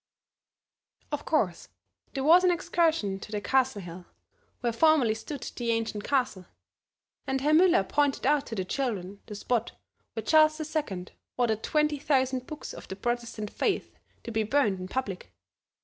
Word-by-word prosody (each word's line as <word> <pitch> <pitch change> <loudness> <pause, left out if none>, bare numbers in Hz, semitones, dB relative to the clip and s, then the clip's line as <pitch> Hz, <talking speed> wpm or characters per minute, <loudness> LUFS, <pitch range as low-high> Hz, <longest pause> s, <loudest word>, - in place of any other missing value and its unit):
Of 295 -1 -3
course 195 - 0 0.5
there 270 - -1
was 340 +5 +7
an 365 - +5
excursion 325 - +1
to 210 - -10
the 210 - -1
Castle 260 -2 +1
hill, 175 +1 -9 0.5
where 235 -1 0
formerly 280 -4 +4
stood 260 +5 -7
the 240 -2 -4
ancient 225 -2 -1
castle; 250 -10 0 0.8
and 265 0 0
Herr 295 +3 +2
Müller 330 - +5
pointed 290 -3 +1
out 290 0 +2
to 225 - -5
the 190 -3 -2
children 205 -5 -3
the 210 - -7
spot 235 +2 -1 0.4
where 225 - -4
Charles 310 +4 +5
II 300 - -3 0.3
ordered 225 -3 +1
twenty 300 +1 +1
thousand 260 -3 +1
books 305 -1 -7
of - - -10
the 190 - -6
Protestant 235 -1 -3
faith - - -1 0.3
to 235 - -6
be 220 -1 +1
burned 215 -4 +1
in 185 - -5
public. 200 -5 -4
245 Hz, 160 wpm, -28 LUFS, 210-295 Hz, 0.8 s, was